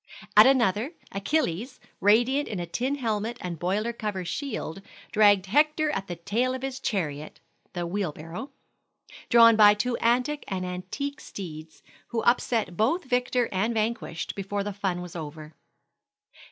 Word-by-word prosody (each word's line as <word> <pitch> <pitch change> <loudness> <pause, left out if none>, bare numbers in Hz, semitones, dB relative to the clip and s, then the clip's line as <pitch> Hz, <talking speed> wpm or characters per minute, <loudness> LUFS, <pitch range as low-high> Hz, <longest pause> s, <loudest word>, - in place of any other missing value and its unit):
At 210 +4 +9
another, 245 - +2 0.2
Achilles, 225 - -1 0.2
radiant 240 +8 +3
in 200 - -4
a 175 - -3
tin 255 +10 -1
helmet 230 -3 -2
and 175 -3 -5
boiler 205 +7 -1
cover 210 -5 -4
shield, 195 - -4 0.3
dragged 205 -3 +5
Hector 300 +7 +2
at 195 -7 -3
the 175 - -4
tail 235 +9 -1
of 260 - -7
his 265 -1 -4
chariot 155 - -3 0.3
(the 175 -1 -3
wheel 185 -1 -2
barrow), 165 - -8 0.8
drawn 230 -1 +7
by 210 -1 +7
two 240 +3 -1
antic 250 +5 +1
and 185 -1 -3
antique 230 +11 -5
steeds, 160 -4 -9 0.2
who 235 -1 -2
upset 235 -5 +1
both 310 - +1
victor 250 -2 +1
and 215 +5 0
vanquished 220 -6 -2
before 200 +1 -3
the 205 0 -4
fun 185 -3 -2
was 180 -1 -10
over. 155 -1 -7
210 Hz, 150 wpm, -26 LUFS, 180-250 Hz, 0.8 s, At